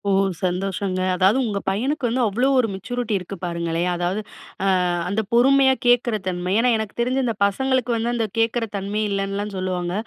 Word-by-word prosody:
ஓ! -, -, +3 dB, 0.3 s
சந்தோஷங்க. 185 Hz, +1 st, -1 dB, 0.2 s
அதாவது, 190 Hz, +6 st, +3 dB
உங்க 205 Hz, -3 st, -2 dB
பையனுக்கு 255 Hz, +7 st, -1 dB
வந்து 250 Hz, +3 st, 0 dB
அவ்ளோ 235 Hz, +6 st, +1 dB
ஒரு 240 Hz, -, +2 dB
மெச்சூரிட்டி 235 Hz, +4 st, -3 dB
இருக்கு 185 Hz, +1 st, -7 dB
பாருங்களேன், 170 Hz, 0 st, -1 dB
அதாவது 175 Hz, +4 st, -1 dB, 0.4 s
அ -, -, +2 dB, 0.4 s
அந்த 205 Hz, +3 st, 0 dB
பொறுமையா 265 Hz, +2 st, +5 dB
கேட்குற 245 Hz, -1 st, +3 dB
தன்மை. 180 Hz, 0 st, -2 dB
ஏன்னா 250 Hz, +2 st, +3 dB
எனக்கு 220 Hz, -2 st, -5 dB
தெரிஞ்சு 255 Hz, +2 st, +1 dB
இந்த 230 Hz, -2 st, -1 dB
பசங்களுக்கு 255 Hz, +4 st, 0 dB
வந்து, 235 Hz, +2 st, -1 dB
அந்த 225 Hz, -2 st, 0 dB
கேக்குற 225 Hz, +1 st, +1 dB
தன்மையே 205 Hz, +2 st, -2 dB
இல்லன்னுலாம் 200 Hz, +1 st, -2 dB
சொல்லுவாங்க. 180 Hz, -1 st, -2 dB
210 Hz, 165 wpm, -22 LUFS, 185-240 Hz, 0.4 s, பொறுமையா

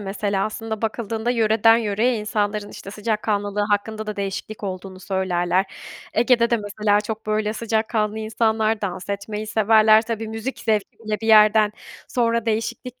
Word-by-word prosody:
mesela 200 Hz, 0 st, -1 dB
aslında 220 Hz, 0 st, -5 dB
bakıldığında 225 Hz, +1 st, -2 dB
yöreden 225 Hz, -1 st, +4 dB
yöreye 225 Hz, +2 st, +1 dB
insanların, 210 Hz, -1 st, -2 dB
işte, 195 Hz, -, -9 dB
sıcakkanlılığı 210 Hz, -1 st, -1 dB
hakkında 215 Hz, +1 st, -1 dB
da 210 Hz, -, -4 dB
değişiklik 200 Hz, +2 st, -5 dB
olduğunu 185 Hz, -1 st, -6 dB
söylerler. 190 Hz, -1 st, 0 dB, 0.5 s
Ege'de 235 Hz, 0 st, +3 dB
de 235 Hz, -, +4 dB
mesela 205 Hz, 0 st, 0 dB
çok, 220 Hz, +1 st, -6 dB
böyle, 215 Hz, 0 st, 0 dB
sıcakkanlı 220 Hz, -1 st, -1 dB
insanlar; 220 Hz, 0 st, 0 dB
dans 190 Hz, -1 st, -4 dB
etmeyi 210 Hz, +2 st, -4 dB
severler. 220 Hz, 0 st, +5 dB
Tabii, 225 Hz, -1 st, -4 dB
müzik 225 Hz, +4 st, -5 dB
zevki 215 Hz, -2 st, -1 dB
bile 215 Hz, 0 st, -2 dB
bir 225 Hz, -, -4 dB
yerden 215 Hz, -1 st, +6 dB, 0.4 s
sonra 235 Hz, -1 st, 0 dB
değişiklik 230 Hz, +3 st, -3 dB
215 Hz, 145 wpm, -22 LUFS, 205-225 Hz, 0.5 s, yerden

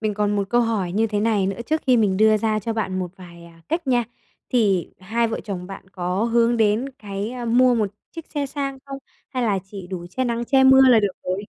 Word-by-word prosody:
mình 215 Hz, -2 st, -1 dB
còn 205 Hz, 0 st, 0 dB
một 200 Hz, -1 st, -1 dB
câu 240 Hz, -, +4 dB
hỏi 215 Hz, -7 st, -1 dB
như 220 Hz, +4 st, +2 dB
thế 210 Hz, -1 st, -2 dB
này 210 Hz, -3 st, +1 dB
nữa 195 Hz, -, -2 dB
trước 315 Hz, +1 st, 0 dB
khi 255 Hz, -2 st, +5 dB
mình 205 Hz, -5 st, +2 dB
đưa 215 Hz, +1 st, +5 dB
ra 215 Hz, 0 st, 0 dB
cho 225 Hz, +2 st, -3 dB
bạn 205 Hz, -4 st, -2 dB
một 180 Hz, -2 st, -3 dB
vài, 170 Hz, -2 st, -13 dB
à, 165 Hz, -1 st, -17 dB
cách 330 Hz, 0 st, -2 dB
nha. 245 Hz, -2 st, +2 dB, 0.5 s
Thì 200 Hz, -8 st, +1 dB
hai 230 Hz, +5 st, 0 dB
vợ 225 Hz, -, -3 dB
chồng 185 Hz, -4 st, -5 dB
bạn 195 Hz, 0 st, -10 dB
có 185 Hz, +2 st, -2 dB
hướng 235 Hz, 0 st, +2 dB
đến 220 Hz, +4 st, +2 dB
cái, 200 Hz, +1 st, -5 dB
a, 250 Hz, -1 st, -6 dB
mua 245 Hz, +2 st, +4 dB
một 215 Hz, -4 st, 0 dB, 0.2 s
chiếc 330 Hz, -1 st, -9 dB
xe 290 Hz, -1 st, -1 dB
sang 275 Hz, -1 st, -4 dB
không? 275 Hz, 0 st, -6 dB, 0.3 s
Hay 255 Hz, -2 st, -3 dB
là 210 Hz, -4 st, +1 dB
chỉ 195 Hz, -1 st, -9 dB
đủ 180 Hz, -2 st, -6 dB
che 260 Hz, +6 st, -2 dB
nắng 235 Hz, 0 st, -1 dB
che 265 Hz, +1 st, +3 dB
mưa 265 Hz, 0 st, +7 dB
là 235 Hz, -3 st, +6 dB
được 205 Hz, -3 st, 0 dB
rồi? 185 Hz, +3 st, -2 dB
220 Hz, 250 wpm, -22 LUFS, 195-240 Hz, 0.5 s, mưa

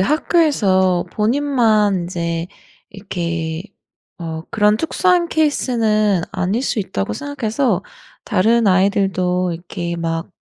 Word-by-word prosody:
학교에서 195 Hz, -, +2 dB
본인만 225 Hz, -3 st, +2 dB
인제 170 Hz, -1 st, -3 dB, 0.4 s
이렇게 170 Hz, -4 st, -4 dB, 0.6 s
어 160 Hz, -1 st, -5 dB
‘그런 210 Hz, -1 st, +3 dB
특수한 345 Hz, +5 st, +1 dB
케이스는 220 Hz, -, +1 dB
아닐 190 Hz, +7 st, -1 dB
수 240 Hz, -, -1 dB
있다.‘고 105 Hz, -, -2 dB
생각해서 240 Hz, -, -1 dB, 0.4 s
다른 225 Hz, +2 st, +2 dB
아이들도 185 Hz, -2 st, +1 dB
이렇게 170 Hz, 0 st, -5 dB
막 165 Hz, 0 st, -3 dB
200 Hz, 240 characters per minute, -19 LUFS, 175-235 Hz, 0.6 s, 그런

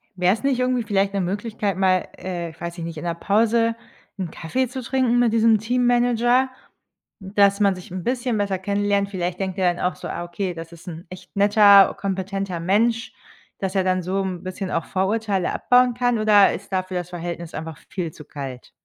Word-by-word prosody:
Wäre 180 Hz, 0 st, +3 dB
es 220 Hz, -, -6 dB
nicht 270 Hz, -2 st, +1 dB
irgendwie 250 Hz, -1 st, +1 dB
vielleicht 200 Hz, -2 st, 0 dB
'ne 200 Hz, -, 0 dB
Möglichkeit, 205 Hz, +1 st, -2 dB
mal, 185 Hz, -1 st, +2 dB
äh, 175 Hz, -2 st, -5 dB
weiß 170 Hz, +1 st, -6 dB
ich 170 Hz, -, -5 dB
nicht, 165 Hz, -1 st, -6 dB
in 165 Hz, -, -6 dB
der 170 Hz, -, 0 dB
Pause 230 Hz, +5 st, +2 dB, 0.4 s
'n 185 Hz, -3 st, -3 dB
Kaffee 255 Hz, +14 st, -2 dB
zu 255 Hz, +1 st, -6 dB
trinken 245 Hz, -1 st, +1 dB
mit 240 Hz, -2 st, +3 dB
diesem 225 Hz, -1 st, +5 dB
Teammanager? 245 Hz, +2 st, +2 dB, 0.7 s
Dass 200 Hz, 0 st, +2 dB
man 200 Hz, -2 st, +3 dB
sich 180 Hz, -1 st, -12 dB
'n 185 Hz, -1 st, -5 dB
bisschen 245 Hz, -1 st, -1 dB
besser 200 Hz, -2 st, 0 dB
kennenlernt. 200 Hz, +1 st, 0 dB
Vielleicht 180 Hz, -2 st, -3 dB
denkt 190 Hz, -1 st, -3 dB
er 180 Hz, -1 st, +3 dB
dann -, -, -6 dB
auch 180 Hz, -, 0 dB
so: -, -, -8 dB
„Ah, 175 Hz, -, -4 dB
okay, 180 Hz, +2 st, -4 dB
das 165 Hz, 0 st, -8 dB
ist 170 Hz, +1 st, -14 dB
'n 165 Hz, 0 st, -8 dB
echt 185 Hz, +2 st, -12 dB
netter, 200 Hz, -1 st, +6 dB
kompetenter 195 Hz, -2 st, -3 dB
Mensch.“ 225 Hz, +6 st, +1 dB, 0.5 s
Dass 190 Hz, 0 st, -3 dB
er 190 Hz, -, +3 dB
dann 185 Hz, 0 st, +1 dB
so 185 Hz, +2 st, -1 dB
'n 185 Hz, -2 st, -4 dB
bisschen 185 Hz, 0 st, -5 dB
auch 165 Hz, -, -1 dB
Vorurteile 195 Hz, -1 st, -1 dB
abbauen 250 Hz, 0 st, +3 dB
kann, 245 Hz, 0 st, +1 dB
oder 210 Hz, -2 st, +5 dB
ist 200 Hz, -, -8 dB
dafür 185 Hz, 0 st, -1 dB
das 175 Hz, 0 st, -4 dB
Verhältnis 170 Hz, -1 st, -6 dB
einfach 160 Hz, 0 st, -6 dB
viel 175 Hz, -5 st, -4 dB
zu 150 Hz, -, -13 dB
kalt? 135 Hz, -4 st, -8 dB
195 Hz, 200 wpm, -22 LUFS, 180-225 Hz, 0.7 s, netter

